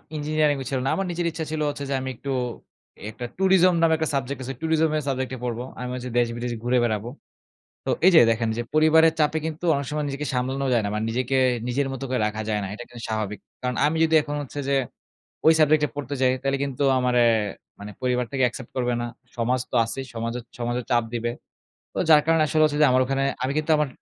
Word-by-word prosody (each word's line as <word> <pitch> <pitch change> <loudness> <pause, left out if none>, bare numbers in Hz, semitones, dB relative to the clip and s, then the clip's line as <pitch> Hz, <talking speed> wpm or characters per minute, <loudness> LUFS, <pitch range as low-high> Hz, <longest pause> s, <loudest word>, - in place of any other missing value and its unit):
Engineering 150 -1 +1
ছিল 135 - -1
না। - - +1
আমার 195 - -1
নিজের 175 0 -2
ইচ্ছা 165 0 -4
ছিল 155 -1 -2
হচ্ছে 145 -1 -5
যে - - 0
আমি 130 0 -4
একটু 135 +4 -5 0.8
একটা 115 +3 -7
tourism 185 -1 +4
নামে 165 -1 +4
একটা 160 -1 -1
subject 135 0 -2
আছে। 135 +1 -5
tourism 160 0 +2
এর - - -1
subject 130 -1 -2
নিয়ে 130 -2 -6
পড়বো। 120 0 -3 0.2
আমি 125 0 -4
হচ্ছে 125 0 -5
দেশ-বিদেশ 120 0 0
ঘুরে 125 +1 +2
বেড়াবো। 110 -1 -1 0.8
তো - - -1 0.2
এই - - +9
যে 160 - +9
দেখেন 115 0 0
যে 120 - -1
পরিবারের 160 +1 +5
চাপে 155 +1 +2
কিন্তু 160 +2 -6
অনেক 140 -1 -2
সময় 150 0 -2
নিজেকে 140 +2 -4
সামলানো 130 +2 -1
যায় 120 -2 +3
না। - - -1
মানে 105 +1 -1
নিজেকে 125 +3 0 0.3
নিজের 135 +3 0
মত 135 - -6
করে 130 -2 0
রাখা 110 +1 -3
যায় 105 -1 0
না। - - -3
এটা 110 - -8
কিন্তু 120 -1 -11
স্বাভাবিক 105 -2 -2 0.2
কারণ 125 0 -2
আমি 155 +2 0
যদি 160 0 +1
এখন 145 0 -4
হচ্ছে 145 +1 -8
যে, 140 - +2 0.7
ওই 160 - +8
subject 155 0 +4
এ - - -3
পড়তে 145 -1 -4
চাই 130 -1 +4
তাইলে 135 0 0
কিন্তু 140 0 -2 0.2
আমারে 125 -1 +2 0.6
মানে 105 +1 -8
পরিবার 125 -1 +1
থেকে 135 -2 0
accept 120 0 -9
করবে 125 -1 0
না। - - -2 0.3
সমাজ 125 +2 +1
তো - - -3
আছেই, 135 +4 -5
সমাজ 115 0 -3 0.3
সমাজে 120 +1 -1
চাপ 120 -1 +3
দিবে। 120 0 -1 0.6
তো - - -8
যার 150 -2 +8
কারণে 165 0 +3
আসলে 155 +1 +2
হচ্ছে 145 -1 0
যে - - +8
আমার 130 0 +4
ওখানে 135 +1 0 0.2
আমি 130 - 0
কিন্তু 155 +1 0
আমার 150 -1 +1
135 Hz, 225 wpm, -24 LUFS, 120-150 Hz, 0.8 s, এই